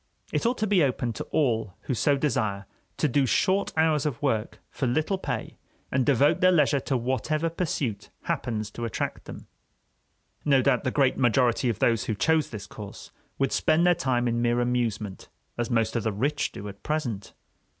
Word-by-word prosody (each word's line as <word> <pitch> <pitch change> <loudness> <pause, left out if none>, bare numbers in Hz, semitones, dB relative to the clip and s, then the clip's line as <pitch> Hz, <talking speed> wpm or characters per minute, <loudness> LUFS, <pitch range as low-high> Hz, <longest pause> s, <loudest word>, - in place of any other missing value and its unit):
It - - +1
ought 245 +1 0
to 215 - 0
be 200 -4 +3
open 125 -3 0
to - - -5
all 115 - 0
who - - -3
so 140 +4 +2
desire 110 -8 -1 0.3
to 155 - +2
do 135 0 +2
short 195 - +2
hours 155 -2 +3
of 145 -6 -2
work 115 -6 -1
for 130 - -2
little 155 +9 0
pay, 125 -10 -4 0.3
and 130 0 +2
devote 145 - +3
their 185 0 +6
leisure 150 -4 +3
to 135 0 -1
whatever 140 +7 -1
pursuit 140 - -3
happens 110 -3 -2
to 120 - -5
attract 115 - -3
them. - - -9 1.0
No 135 -3 +4
doubt 130 -4 +2
the - - +2
great 135 -1 +2
majority 125 0 +3
of 115 - -1
those 115 -1 +2
who 110 - -1
chose 160 +7 +2
this 105 -3 -7
course 105 -2 -10 0.3
would 135 - +1
spend 160 +2 +2
their 180 - +6
time 125 -5 0
in 120 0 0
mere 120 0 +2
amusement, 115 -5 -2 0.3
as 120 +1 -2
most 115 -2 +1
of 115 - +1
the 110 - -1
rich 140 +9 -1
do 105 - -8
at 100 0 -10
present. 125 -11 -3
130 Hz, 190 wpm, -26 LUFS, 115-150 Hz, 1.0 s, their